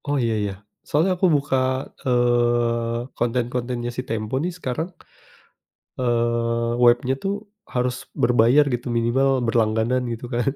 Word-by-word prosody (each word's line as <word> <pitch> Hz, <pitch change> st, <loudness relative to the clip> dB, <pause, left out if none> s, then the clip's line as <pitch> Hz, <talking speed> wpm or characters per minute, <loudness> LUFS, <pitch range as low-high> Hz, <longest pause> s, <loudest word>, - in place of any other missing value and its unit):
Oh 145 Hz, 0 st, +1 dB
iya, 115 Hz, -1 st, +1 dB
ya. 100 Hz, -, -4 dB, 0.3 s
Soalnya 160 Hz, +6 st, +2 dB
aku 185 Hz, +1 st, +2 dB
buka, 140 Hz, -1 st, 0 dB, 0.5 s
eee, 120 Hz, -1 st, +1 dB
konten-kontennya 120 Hz, 0 st, -1 dB
si 125 Hz, -, -2 dB
Tempo 110 Hz, +1 st, -2 dB
nih 175 Hz, -, 0 dB
sekarang, 160 Hz, +2 st, -3 dB, 1.1 s
eee, 115 Hz, -1 st, 0 dB
webnya 120 Hz, +2 st, +4 dB
tuh 195 Hz, -, 0 dB, 0.4 s
harus 125 Hz, 0 st, 0 dB, 0.3 s
berbayar 120 Hz, +4 st, +5 dB
gitu. 120 Hz, +1 st, -4 dB
Minimal 120 Hz, +4 st, +2 dB, 0.2 s
berlangganan 115 Hz, +2 st, +1 dB
gitu 115 Hz, +1 st, -7 dB
kan. 120 Hz, +3 st, +1 dB
120 Hz, 125 wpm, -23 LUFS, 115-130 Hz, 1.1 s, berbayar